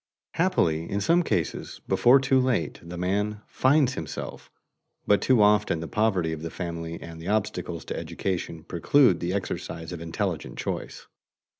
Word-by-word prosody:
Happily 85 - +1
in 100 - -1
some 170 - +3
cases, 170 - -2
before 130 +3 +5
too 135 0 +3
late, 125 -10 0
the 85 +1 -8
man 105 +4 -1
"finds 135 -1 +3
himself," 80 -10 -6 0.6
but 105 - +4
too 125 -5 +4
often 105 -5 +3
the 85 - -5
poverty 95 -7 +1
of 80 - -6
the 80 - -4
family 85 -1 -5
and 80 -1 -9
the 85 - -8
obstacles 90 -6 -2
to - - -4
education 85 -4 -3
preclude 125 - +3
the 85 +1 -2
exercise 90 -4 -4
of 85 -2 -6
intelligent 80 -1 -3
choice. - - -4
95 Hz, 155 wpm, -26 LUFS, 85-115 Hz, 0.6 s, before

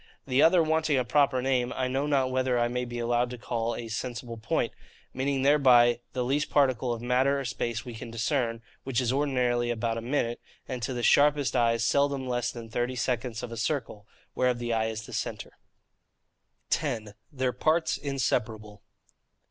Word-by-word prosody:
The 130 0 +2
other, 170 0 +6
wanting 160 -2 +1
a 125 - +1
proper 135 +1 +2
name, 125 -2 +1
I 130 -1 -1
know 135 +3 -1
not 135 -3 +1
whether 130 -1 +1
I 120 0 +2
may 125 +1 -2
be 120 0 -6
allowed 120 +1 +1
to 125 - -7
call 115 +1 -2
a 120 - -6
SENSIBLE 115 +1 -5
POINT, 110 - -1 0.4
meaning 135 +1 -1
thereby 125 -4 +5
the 125 -1 -1
least 140 +4 0
particle 130 -4 +2
of 120 0 -4
matter 130 +3 +2
or 135 - -4
space 120 -2 -3
we 120 - -7
can 115 +1 -8
discern, 115 0 -1 0.2
which 130 -2 -1
is 125 -1 0
ordinarily 125 -4 +1
about 115 -1 -1
a - - -7
minute, 120 -1 -1 0.3
and 130 -2 -5
to 125 +3 -2
the 120 - -3
sharpest 145 0 +4
eyes 115 -1 +2
seldom 140 +2 +1
less 125 -1 -1
than 115 -2 -8
thirty 120 +3 -2
seconds 125 -2 -2
of 120 - -6
a 115 - -6
circle, 115 -4 -3 0.3
whereof 125 -1 +1
the 120 -1 -2
eye 110 0 +1
is 110 0 -4
the - - -11
centre. - - -4 1.2
10. 115 -9 -1 0.2
Their 130 -2 -1
Parts 160 +6 +1
inseparable. 110 -6 -2
125 Hz, 185 wpm, -28 LUFS, 115-135 Hz, 1.2 s, other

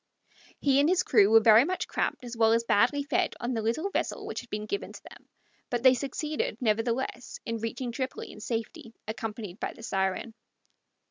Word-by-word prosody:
He 275 -1 +3
and 290 +3 +4
his 365 0 +3
crew 210 - +5
were 225 0 +7
very 220 +1 +7
much 365 +5 -2
cramped - - -2
as 240 0 -6
well 225 0 +4
as 230 0 +2
badly 245 +6 +2
fed 355 +5 0
on 240 +2 -2
the 225 - -1
little 275 - -1
vessel - - -2
which - - -4
had 245 - -17
been 210 0 -4
given 400 - -4
to - - -12
them, - - -15 0.4
but 240 -1 -2
they 260 -1 +8
succeeded, 300 - -3
nevertheless, 235 +2 -1
in 230 0 -3
reaching 230 +2 -4
Tripoli 260 +2 -4
in - - -12
safety, 225 0 -5
accompanied 220 -3 -5
by - - -3
the - - -14
Siren. 190 +2 -1
235 Hz, 195 wpm, -28 LUFS, 225-270 Hz, 0.4 s, they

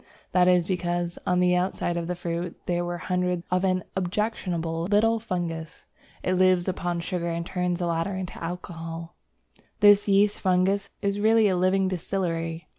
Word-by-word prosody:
That 180 -1 +4
is 180 -2 +4
because, 175 -2 -2
on 180 0 +2
the 180 0 +3
outside 180 -1 -1
of 170 -1 -2
the 180 - -2
fruit, 170 0 -4
there 175 -1 0
were 175 0 -3
hundreds 180 -1 -1
of 180 +1 +2
an 185 -1 +1
objectionable 175 -4 -2
little 220 +4 +3
fungus. 170 -6 -4 0.4
It 185 - +1
lives 185 -1 +3
upon 175 -2 -2
sugar 170 -1 -2
and 170 0 -3
turns 180 0 -1
the 175 - -2
latter 170 +3 -1
into 185 -2 -6
alcohol. 165 -1 -6 0.7
This 205 -1 +6
yeast 200 +1 +3
fungus 190 +1 +1
is 200 0 0
really 220 +1 +4
a 190 - +2
living 185 +1 +2
distillery. 170 -2 -3
180 Hz, 165 wpm, -26 LUFS, 170-190 Hz, 0.7 s, This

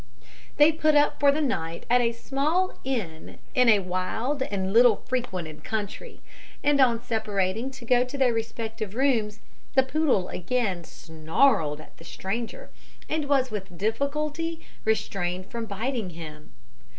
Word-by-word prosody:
They 295 +2 +7
put 310 -1 +2
up 290 0 +3
for 280 0 +6
the 305 +2 0
night 170 - -2
at 245 +1 +4
a 235 -1 +2
small 290 +10 -1
inn 210 -12 -4 0.2
in 250 -4 +5
a 210 -3 +6
wild 190 +10 -2
and 195 -5 -2
little 235 -2 +6
frequented 185 - -3
country; 210 -3 -5 0.4
and 290 -1 +4
on 235 -3 +3
separating 220 -1 -1
to 265 -3 -11
go 245 +1 +4
to 255 +3 -6
their 260 -3 +3
respective 225 -2 -4
rooms, 225 -6 +1 0.3
the 265 - +6
poodle 265 - +1
again 190 -3 -1
snarled 160 - +1
at 155 - -15
the - - -14
stranger, 230 - -5 0.4
and 310 -1 -1
was 265 -3 +2
with 190 -4 -6
difficulty 300 - -2 0.2
restrained 185 -4 -1
from 230 -1 -4
biting 220 +1 -2
him. 155 -3 -10
230 Hz, 145 wpm, -26 LUFS, 190-270 Hz, 0.4 s, They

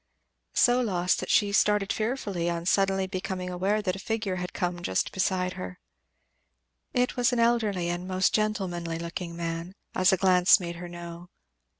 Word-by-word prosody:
So 245 0 +4
lost, 180 -6 +1
that - - -5
she 205 -1 +3
started 205 -1 +2
fearfully 210 -7 -2
on 170 0 -3
suddenly 195 0 +2
becoming 185 -1 -4
aware 195 +4 0
that 185 -2 -1
a - - -7
figure 215 -2 -2
had 180 0 -4
come 175 -1 -2
just 95 - -1
beside 185 -1 0
her. 185 0 -7 1.1
It 250 0 +1
was 245 +1 +2
an 245 - 0
elderly 220 -7 +2
and 175 +1 -3
most 185 0 +1
gentlemanly 185 -6 -1
looking 170 +1 -5
man, 170 +2 -4 0.2
as 185 +2 +4
a 190 - +3
glance 185 +1 +5
made 170 -2 -5
her 175 0 -7
know. 175 0 -9
185 Hz, 170 wpm, -27 LUFS, 175-205 Hz, 1.1 s, glance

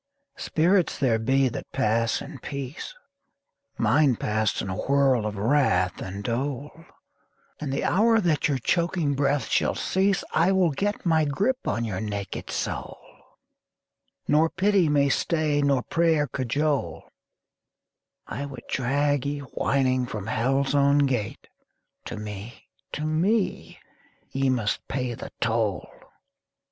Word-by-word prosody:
Spirits 175 +3 +1
there 120 -5 +2
be 135 +4 +2
that 125 - -6
pass 115 +1 +1
in 145 -1 -10
peace; 140 - -6 0.8
Mine 130 +4 +3
passed 110 0 0
in - - -3
a 95 - -3
whorl 135 -4 +2
of 105 -1 -5
wrath 100 -6 +2
and 100 +2 -6
dole; 135 +4 -2 0.9
And 145 -3 -4
the 140 - -1
hour 225 +4 +3
that 170 -7 +1
your 140 -3 0
choking 170 +2 0
breath 140 -2 +1
shall - - +1
cease 190 0 +1
I 170 +5 +3
will 185 -4 +3
get 205 +9 -2
my 160 -2 +3
grip 210 - -1
on 115 - 0
your 100 -3 -3
naked 100 -2 -5
soul - - -4 1.3
Nor 155 +2 +4
pity 190 -1 +2
may 145 -1 +3
stay 155 0 +1
nor 140 -3 +2
prayer 165 -3 +2
cajole 135 - -2 1.2
I 140 +1 -5
would 135 -2 -9
drag 140 +1 +1
ye 145 0 -3
whining 130 -2 +1
from 105 -4 -5
Hell's 135 +5 0
own 140 0 +4
gate: 120 -7 -3 0.6
To - - -6
me, 105 +2 -8 0.3
to 150 - -3
me, 185 +7 0 0.5
ye 135 0 +1
must 120 -5 -1
pay 125 -2 -2
the - - -8
toll! 110 -5 0
140 Hz, 135 wpm, -25 LUFS, 115-155 Hz, 1.3 s, Nor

